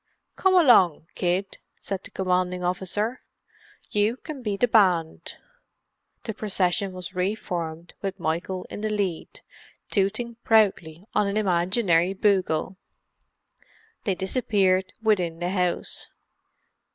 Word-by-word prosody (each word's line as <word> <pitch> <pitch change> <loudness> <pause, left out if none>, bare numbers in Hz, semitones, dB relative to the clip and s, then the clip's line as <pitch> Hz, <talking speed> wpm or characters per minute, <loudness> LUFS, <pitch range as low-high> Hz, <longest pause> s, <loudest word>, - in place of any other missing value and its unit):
"Come 380 -1 +3
along, 220 - +5
kid," 185 +2 -1 0.2
said 195 -1 -4
the - - -9
commanding 180 -1 -1
officer. 190 +6 -2 0.7
"You 210 +4 +2
can 295 -1 -8
be 210 -4 -2
the 245 - +3
band." 185 -8 +2 0.9
The 220 - -4
procession 195 -2 0
was 185 -1 -7
re 185 +3 0
formed 170 -4 -5
with 195 -1 -4
Michael 170 +3 -2
in - - -6
the 215 - -1
lead, 200 -6 -3 0.5
tooting 220 +4 0
proudly 190 -6 +2
on 205 - +2
an 200 +1 -1
imaginary 180 -2 +2
bugle. 190 -3 +1 1.3
They 195 -4 +1
disappeared 190 -2 +1
within 180 -7 +1
the 175 +1 -2
house. 180 -2 -1
190 Hz, 115 wpm, -25 LUFS, 180-210 Hz, 1.3 s, along